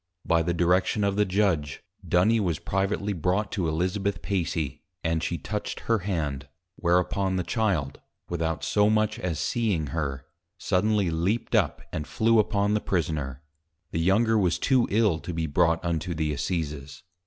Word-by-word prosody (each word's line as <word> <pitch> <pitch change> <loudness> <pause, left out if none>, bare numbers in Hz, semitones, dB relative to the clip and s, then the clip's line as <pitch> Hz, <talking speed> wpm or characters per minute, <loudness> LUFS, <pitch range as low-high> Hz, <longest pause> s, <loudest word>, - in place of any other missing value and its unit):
By 85 -1 +3
the 85 +2 0
direction 90 +4 +2
of 100 -1 +1
the 105 0 +3
Judg, 90 -8 +1 0.3
Duny 105 +6 +3
was 90 -7 0
privately 100 +3 -1
brought 95 +4 0
to 90 -5 -1
Elizabeth 95 +5 -1
Pacy, 80 -7 -2 0.2
and 80 -1 0
she 85 +1 -2
touched 105 +3 -4
her 115 -1 +1
Hand: 75 -8 -3 0.3
whereupon 90 +2 +1
the 90 - 0
Child, 90 - -1 0.3
without 80 -2 -2
so 105 0 +3
much 110 0 +1
as 90 -4 -2
seeing 85 - 0
her, 70 -4 -3 0.3
suddenly 100 -1 +1
leap'd 95 +9 0
up 95 -9 +1
and 75 - -3
flew 115 0 +3
upon 105 -1 +2
the 105 - +1
Prisoner; 75 -6 -2 0.5
the 80 - -2
younger 110 +6 +3
was 90 -4 +2
too 130 -3 +2
ill, 105 -6 +2
to 90 - -6
be 80 -1 -1
brought 85 +2 +2
unto 85 +1 -1
the 75 -1 -1
Assizes. 75 -2 -4
90 Hz, 160 wpm, -26 LUFS, 80-105 Hz, 0.5 s, By